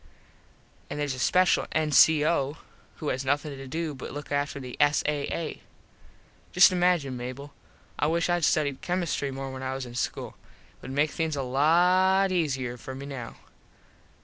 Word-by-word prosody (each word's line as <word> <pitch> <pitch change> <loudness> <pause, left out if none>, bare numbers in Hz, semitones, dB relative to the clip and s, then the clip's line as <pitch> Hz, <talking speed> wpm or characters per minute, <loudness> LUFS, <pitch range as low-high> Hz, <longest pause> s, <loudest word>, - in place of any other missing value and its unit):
An - - -5
theres 145 -2 -1
a 130 - -7
special 180 +7 +3
N.C.O. 155 -1 +3 0.4
who 150 - -4
has 130 - -2
nothin 145 +2 -1
to 135 0 -9
do 160 +2 -3
but 130 - -8
look 145 0 -8
after 145 0 -1
the 125 -2 -8
S.A.A. 150 +2 0 0.9
Just 180 +1 +7
imagine, 175 -7 +1
Mable. 130 +4 -7 0.5
I 145 - +2
wish 165 +1 +1
Id 175 -1 0
studied 145 -3 +1
chemistree 175 -5 -1
more 135 0 -5
when 130 0 -7
I 130 0 -3
was 135 -1 -4
in 120 - -10
school. 120 - -4 0.4
It - - -31
would - - -8
make 145 +2 +1
things 160 -2 -2
a 140 - -2
lot 180 +8 +3
easier 135 -8 -1
for 130 +2 -8
me 135 +1 -7
now. 130 -5 -7
145 Hz, 165 wpm, -27 LUFS, 135-165 Hz, 0.9 s, Just